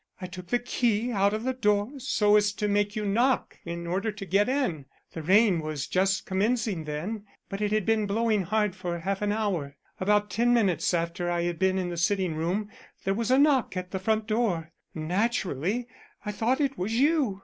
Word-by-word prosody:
I 185 Hz, -, -5 dB
took 180 Hz, 0 st, -9 dB
the 245 Hz, -, +2 dB
key 240 Hz, -1 st, 0 dB
out 200 Hz, -2 st, +2 dB
of 215 Hz, +1 st, -3 dB
the 260 Hz, +1 st, 0 dB
door 210 Hz, -2 st, +1 dB
so 225 Hz, -5 st, +3 dB
as 205 Hz, -1 st, +3 dB
to 210 Hz, -, -2 dB
make 205 Hz, +1 st, +1 dB
you 215 Hz, -1 st, -2 dB
knock 240 Hz, +6 st, +1 dB
in 170 Hz, 0 st, -5 dB
order 195 Hz, +6 st, -1 dB
to 205 Hz, -1 st, -8 dB
get 200 Hz, +5 st, +2 dB
in. 250 Hz, -, -1 dB, 0.3 s
The 165 Hz, -, -6 dB
rain 190 Hz, +2 st, +4 dB
was 155 Hz, -3 st, -3 dB
just 190 Hz, +1 st, +1 dB
commencing 205 Hz, -3 st, 0 dB
then, 185 Hz, +9 st, -4 dB, 0.2 s
but 195 Hz, +1 st, -5 dB
it 210 Hz, -1 st, 0 dB
had 215 Hz, -3 st, +1 dB
been 220 Hz, -2 st, +2 dB
blowing 215 Hz, 0 st, +1 dB
hard 210 Hz, +1 st, 0 dB
for 175 Hz, -2 st, -4 dB
half 195 Hz, +4 st, -3 dB
an 205 Hz, 0 st, +1 dB
hour. 185 Hz, -10 st, -2 dB, 0.2 s
About 205 Hz, +2 st, +2 dB
ten 240 Hz, +2 st, +3 dB
minutes 190 Hz, -5 st, +2 dB
after 170 Hz, +1 st, -2 dB
I 175 Hz, 0 st, 0 dB
had 175 Hz, -1 st, -2 dB
been 190 Hz, 0 st, +2 dB
in 180 Hz, -2 st, -1 dB
the 175 Hz, -, -5 dB
sitting 180 Hz, 0 st, +1 dB
room 180 Hz, +7 st, -2 dB, 0.3 s
there 195 Hz, -, +1 dB
was 225 Hz, +2 st, -2 dB
a 260 Hz, -, +5 dB
knock 275 Hz, -9 st, +3 dB
at 180 Hz, 0 st, -5 dB
the 190 Hz, -, -2 dB
front 220 Hz, +3 st, 0 dB
door. 210 Hz, -8 st, -1 dB, 0.2 s
Naturally 190 Hz, -, -1 dB, 0.4 s
I 210 Hz, -, -2 dB
thought 230 Hz, +5 st, 0 dB
it 275 Hz, -2 st, 0 dB
was 205 Hz, +5 st, -1 dB
you. 280 Hz, -9 st, +2 dB
205 Hz, 205 wpm, -27 LUFS, 180-225 Hz, 0.4 s, a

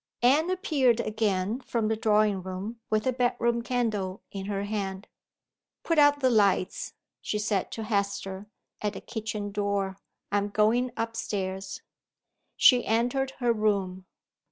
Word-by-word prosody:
Anne 295 Hz, +7 st, +4 dB
appeared 290 Hz, -, +2 dB
again 215 Hz, -1 st, 0 dB
from 230 Hz, -4 st, -1 dB
the 220 Hz, -, +1 dB
drawing 210 Hz, -2 st, +2 dB
room, 190 Hz, +5 st, -6 dB
with 215 Hz, 0 st, +1 dB
her 260 Hz, -, +3 dB
bedroom 240 Hz, -1 st, +1 dB
candle 215 Hz, -6 st, -2 dB
in 195 Hz, -1 st, -5 dB
her 200 Hz, -1 st, -2 dB
hand. 200 Hz, -2 st, -4 dB, 0.8 s
"Put 330 Hz, -2 st, +2 dB
out 290 Hz, 0 st, +5 dB
the 260 Hz, -, +4 dB
lights," 200 Hz, -4 st, +2 dB, 0.3 s
she 210 Hz, -, -2 dB
said 210 Hz, -2 st, 0 dB
to 225 Hz, -, -4 dB
Hester, 200 Hz, -2 st, -2 dB, 0.3 s
at 210 Hz, -1 st, -1 dB
the -, -, -6 dB
kitchen 215 Hz, -2 st, -4 dB
door; 200 Hz, -1 st, -1 dB, 0.3 s
"I 205 Hz, -, +3 dB
am 200 Hz, +1 st, -2 dB
going 220 Hz, +5 st, +2 dB
up 230 Hz, 0 st, -2 dB
stairs." 190 Hz, -2 st, -4 dB, 0.7 s
She 250 Hz, -2 st, +6 dB
entered 245 Hz, +4 st, 0 dB
her 240 Hz, -2 st, +2 dB
room. 195 Hz, -4 st, -1 dB
215 Hz, 145 wpm, -28 LUFS, 200-235 Hz, 0.8 s, She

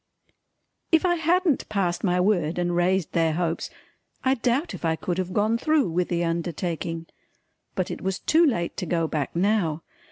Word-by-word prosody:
If 325 Hz, +1 st, +4 dB
I 350 Hz, -, +4 dB
hadn't 340 Hz, -1 st, +1 dB
passed 185 Hz, -4 st, -1 dB
my 180 Hz, -2 st, +2 dB
word 180 Hz, -4 st, +1 dB
and 175 Hz, 0 st, 0 dB
raised 180 Hz, 0 st, +1 dB
their 165 Hz, -2 st, +2 dB
hopes, 170 Hz, 0 st, -1 dB, 0.5 s
I 260 Hz, -, +3 dB
doubt 260 Hz, +5 st, 0 dB
if -, -, -8 dB
I 165 Hz, -1 st, +2 dB
could 175 Hz, +2 st, -3 dB
have 185 Hz, 0 st, -2 dB
gone 215 Hz, +4 st, +1 dB
through 300 Hz, -, +2 dB
with 180 Hz, +2 st, 0 dB
the 175 Hz, -1 st, 0 dB
undertaking 165 Hz, 0 st, -3 dB, 0.7 s
but 185 Hz, -, -1 dB
it -, -, -6 dB
was 190 Hz, 0 st, -1 dB
too 325 Hz, +2 st, +3 dB
late 200 Hz, -, +1 dB
to 180 Hz, -, -3 dB
go 165 Hz, 0 st, +1 dB
back 150 Hz, -2 st, -3 dB
now. 175 Hz, -4 st, +1 dB
180 Hz, 180 wpm, -25 LUFS, 170-225 Hz, 0.7 s, If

